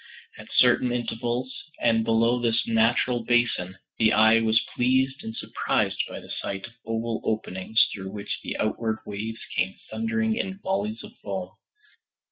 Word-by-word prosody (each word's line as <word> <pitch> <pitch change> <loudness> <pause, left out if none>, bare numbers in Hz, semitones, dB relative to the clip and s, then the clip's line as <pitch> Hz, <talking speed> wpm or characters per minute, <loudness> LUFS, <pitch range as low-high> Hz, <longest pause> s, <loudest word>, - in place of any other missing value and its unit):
At - - -11
certain 125 0 +5
intervals, 120 +1 -2 0.3
and 115 -1 +3
below 115 +2 +3
this 115 -1 +1
natural 115 +2 +2
basin, 115 -6 +1 0.2
the 110 -1 +5
eye 110 +1 +6
was 110 0 +3 0.2
pleased 130 +2 +2
and 110 - -6
surprised - - 0
by - - -6
the - - -12
sight 95 0 -4
of 115 - -13
oval 115 0 -2
openings 110 0 +1
through 95 -1 -6
which 105 +1 -5
the - - -4
outward 110 +1 0
waves 110 +2 -5
came 95 +1 0 0.2
thundering 225 -1 0
in 190 -4 -3
volleys 200 +3 -2
of - - -10
foam. - - -4
115 Hz, 150 wpm, -26 LUFS, 110-125 Hz, 0.3 s, eye